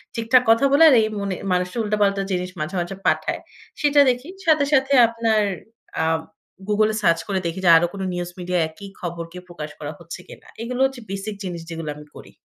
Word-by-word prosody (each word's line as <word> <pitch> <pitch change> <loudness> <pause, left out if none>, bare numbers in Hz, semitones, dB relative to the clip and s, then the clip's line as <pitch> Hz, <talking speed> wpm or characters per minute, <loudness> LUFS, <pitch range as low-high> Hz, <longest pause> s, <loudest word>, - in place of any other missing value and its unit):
ঠিকঠাক 230 +2 +3
কথা 230 +5 +5
বলে, 285 +3 +6
আর 265 - +6
এই 215 - +1
মনে 195 -2 -2 0.2
মানুষটা 180 +4 -1
উল্টাপাল্টা 205 -2 +1
জিনিস 180 0 -1
মাঝে, 155 +5 -4
মাঝে 175 +3 -5
পাঠায়। - - 0 0.4
সেইটা 290 -1 +4
দেখি। 250 +6 -2 0.2
সাথে, 305 -3 +4
সাথে 270 0 +3
আপনার 225 -1 +1 0.6
আ - - +1 0.6
Google 215 +1 +2
এ - - -3
সার্চ 170 -4 +3
করে 195 -2 0
দেখি, 170 +3 -3
যে - - +6
আরো 175 - +2
কোন 200 - -6
নিউজ 175 0 -3
মিডিয়ায় 180 -1 0
একি 180 +6 -12
খবর 170 -1 -5
কি 180 - -10
প্রকাশ 155 -4 -7
করা 150 0 -5
হচ্ছে 170 0 -9
কিনা। - - -14
এইগুলো 245 +2 -4
হচ্ছে 265 -2 -4
বেসিক 195 +2 -5
জিনিস 175 -3 -5
যেগুলো 165 -2 -5
আমি 150 - -12
করি। - - -13
195 Hz, 205 wpm, -22 LUFS, 175-230 Hz, 0.6 s, বলে